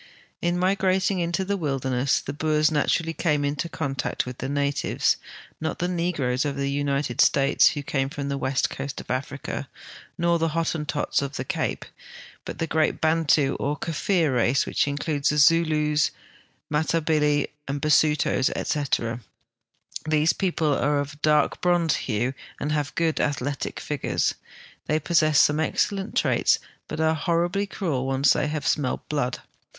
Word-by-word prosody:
In 175 +1 0
migrating 190 0 +1
into 175 +2 -1
tlie 200 0 -1
wilderness, 135 -3 0
the 140 - -5
Boers 155 +1 +2
natuially 165 +2 0
came 150 -4 +1
into 145 +4 -2
contact 140 -5 -2
with 125 -1 -8
the 130 - -3
natives, 140 0 0 0.4
not 160 - -3
the 175 - -1
negroes 165 -8 0
of 145 -2 -2
the 140 0 -1
United 140 -3 0
States, 140 +1 +4
who 145 - -3
came 135 -1 -1
from 140 0 -5
the 140 0 -2
West 130 0 0
Coast 135 0 -5
of - - -7
Africa, 135 +1 -4 0.5
nor 170 -1 +2
the 165 - +1
Hotten 160 -2 -1
tots 145 0 0
of 140 0 -4
the 130 - -4
Cape, - - -2 0.6
hut - - -6
the 165 - -1
great 160 -1 0
Bantu 155 -3 +2
or 145 +1 -1
Kaffir 165 -2 0
race, 120 +3 +2
which - - 0
includes 145 0 -1
the 150 - 0
Zulus, 150 0 +3 0.6
Matal)ili, 150 -1 +1 0.2
Basutos, 145 -1 +2
etc. 125 -5 -1 0.9
These 155 +1 +3
people 165 -5 0
are 145 0 +1
of 145 0 -4
a - - -15
dark 150 0 +2
bronze 175 -3 +2
hue, 120 +2 0 0.3
and 150 - -2
have 150 -1 -2
good 165 -1 +1
athletic 145 -1 -2
figures. 150 -3 -1 0.5
They 155 +1 +1
possess 155 -2 +3
some 150 +1 +4
excellent 195 +5 -1
traits, - - +3 0.3
but 155 - -5
are 160 0 +3
horribly 175 +5 0
cruel 150 -10 -2
when 135 - 0
once 140 - +6
they - - 0
have 150 -2 -3
smelled 140 -4 -1
blood. 145 -4 -2
150 Hz, 155 wpm, -25 LUFS, 140-165 Hz, 0.9 s, once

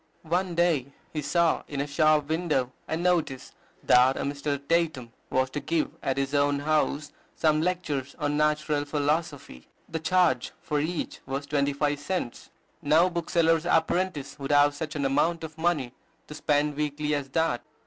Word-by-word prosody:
One 175 +2 -1
day 160 -6 +1 0.2
he 155 - -2
saw 165 +4 +2
in 145 - -5
a 140 - 0
shop 150 0 +2
window 155 -6 0 0.2
a 160 - -1
notice 165 -7 0 0.3
that 125 +2 +5
a - - -2
Mr. 140 0 -2
Tatum 155 -8 0 0.2
was 130 0 +1
to 145 - -3
give 155 +2 -1
at 135 - -1
his 135 +1 -1
own 145 0 +2
house 150 0 0 0.2
some 155 -1 +2
lectures 155 -6 -2
on 145 0 -1
Natural 150 -1 +1
Philosophy. 145 - -2 0.2
The 160 - -4
charge 160 -7 +2
for 150 -2 -2
each 165 +3 -3
was 135 +2 -3
twenty 145 -1 0
five 145 0 0
cents. 145 -5 -4 0.3
No 160 +5 +4
bookseller's 165 -1 +1
apprentice 165 -3 0
would 140 +1 -3
have 145 0 +5
such 155 +1 -5
an 140 -2 -1
amount 160 +5 +1
of 160 -1 -7
money 160 -7 0 0.3
to - - -10
spend 150 -1 0
weekly 150 0 -1
as 140 -2 -2
that. 160 -3 0
150 Hz, 165 wpm, -27 LUFS, 140-165 Hz, 0.3 s, that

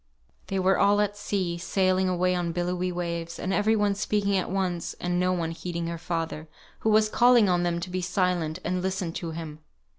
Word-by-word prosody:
They 195 - -2
were 190 +1 +3
all 200 +1 +4
at 205 -1 +1
sea, 185 -4 -2
sailing 185 +1 +1
away 180 0 +1
on 175 -2 -1
billowy 180 +1 -1
waves, 170 -1 -4
and 190 - -2
every 215 +2 +3
one 205 -1 +2
speaking 200 0 0
at 185 - 0
once, 180 -3 -2
and 175 0 -1
no 180 0 +2
one 170 -3 -1
heeding 170 0 -4
her 170 0 -4
father, 165 -2 -3 0.3
who 220 - 0
was 215 0 +5
calling 240 -1 +5
on 180 -1 +2
them 175 -1 0
to 185 - -5
be 185 0 -2
silent, 180 -3 0
and 180 0 -1
listen 185 -2 -2
to 170 - -4
him. 160 -2 -7
180 Hz, 205 wpm, -26 LUFS, 170-195 Hz, 0.3 s, was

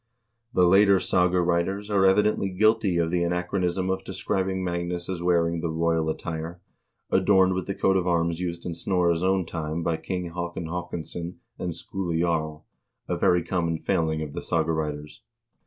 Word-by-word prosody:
The 90 -7 +4
later 100 +2 +6
saga 90 0 +2
writers 90 +4 0
are 95 -2 +4
evidently 100 0 +3
guilty 105 -1 +2
of 85 -1 +1
the 90 -1 +1
anachronism 90 +1 -1
of 95 - -2
describing 95 0 -2
Magnus 85 0 -3
as 90 -2 -4
wearing 85 -1 +1
the 85 - -2
royal 80 0 +1
attire, 80 +1 -4 0.5
adorned 95 0 +4
with 95 0 -3
the 100 - -2
coat 95 - +2
of 90 -1 +1
arms 85 -1 +1
used 85 -1 -4
in 85 - -3
Snorre's 85 -1 +1
own 95 -1 +2
time 80 0 -4
by 80 -1 0
King 90 -1 -4
Haakon 85 0 -4
Haakonsson 85 0 -5 0.2
and 85 -2 -3
Skule 85 -1 -3
Jarl, 80 -3 -1 0.4
a - - -1
very 90 -1 +3
common 85 -1 -1
failing 80 -3 0
of 75 -2 -7
the - - -4
saga 80 -1 0
writers. 75 -1 -4
85 Hz, 170 wpm, -26 LUFS, 85-95 Hz, 0.5 s, later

